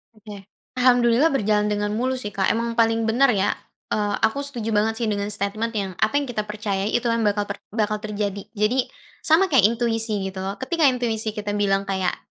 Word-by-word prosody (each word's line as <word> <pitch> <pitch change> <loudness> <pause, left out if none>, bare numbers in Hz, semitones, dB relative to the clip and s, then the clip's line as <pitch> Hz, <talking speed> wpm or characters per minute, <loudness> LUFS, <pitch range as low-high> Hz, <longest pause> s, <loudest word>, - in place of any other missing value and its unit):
Oke. 205 -2 -11 0.3
Alhamdulillah 250 +3 +4
berjalan 210 -4 +1
dengan 205 0 -1
mulus 255 +2 -1
sih, - - -6
Kak 190 -1 +1
emang 230 0 -2
paling 225 0 +2
benar 250 +4 +4
ya. 200 -1 +1 0.4
Eee, 205 -1 0
aku 220 +6 +2
setuju 235 -6 -4
banget 220 +2 +1
sih - - 0
dengan 205 -1 -1
statement 205 +3 -2
yang, 195 -2 -2
"Apa 220 +5 +1
yang - - -2
kita 215 -3 -2
percayai, 210 -1 -2
itu 240 - +1
yang 230 -1 0
bakal 205 0 +1 0.3
bakal 215 -1 0
terjadi." 205 -2 -3
Jadi, 230 +5 +1 0.4
sama 335 +5 +4
kayak 235 -7 +6
intuisi 225 -3 0
gitu, 190 0 -5 0.2
ketika 335 +3 -1
intuisi 230 -4 0
kita 210 -1 -3
bilang 195 -1 +1
kayak 190 -2 -1
215 Hz, 185 wpm, -23 LUFS, 205-235 Hz, 0.4 s, kayak